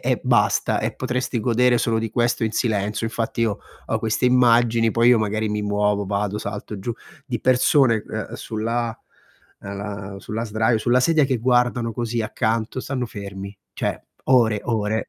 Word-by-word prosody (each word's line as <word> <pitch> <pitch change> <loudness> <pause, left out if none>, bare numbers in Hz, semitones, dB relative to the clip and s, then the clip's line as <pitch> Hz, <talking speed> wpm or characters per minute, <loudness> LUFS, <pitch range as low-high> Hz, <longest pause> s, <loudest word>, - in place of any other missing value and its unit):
e - - 0
basta - - +2
e - - -2
potresti 125 -2 -2
godere 120 +1 +3
solo 115 0 +1
di 110 -1 -3
questo 120 0 +1
in 110 - -2
silenzio. 105 -1 -1
Infatti 115 0 -3
io 105 -3 0 0.3
ho 110 - 0
queste 110 +3 -1
immagini 120 -2 +4
poi 115 +1 +4
io 120 -2 +6
magari 110 0 -1
mi 105 0 -2
muovo, 105 0 0
vado, 105 +1 -1
salto 105 0 -6
giù 115 +5 -3 0.3
di 120 -4 -3
persone, 130 -2 +3
uhm, - - -5
sulla 115 +1 -3 0.7
ehm, 100 0 -6
sulla 110 +3 -4
sdraio 110 +1 +1
sulla 120 +3 +2
sedia 155 +2 +3
che 130 -3 0
guardano 120 -1 +1
così 120 -1 -2
accanto, 110 +2 -1
stanno 130 -2 -3
fermi. 100 -1 -8 0.2
Cioè, - - -2 0.3
ore, 115 -5 +4
ore. 110 -2 -1
115 Hz, 165 wpm, -22 LUFS, 105-120 Hz, 0.7 s, io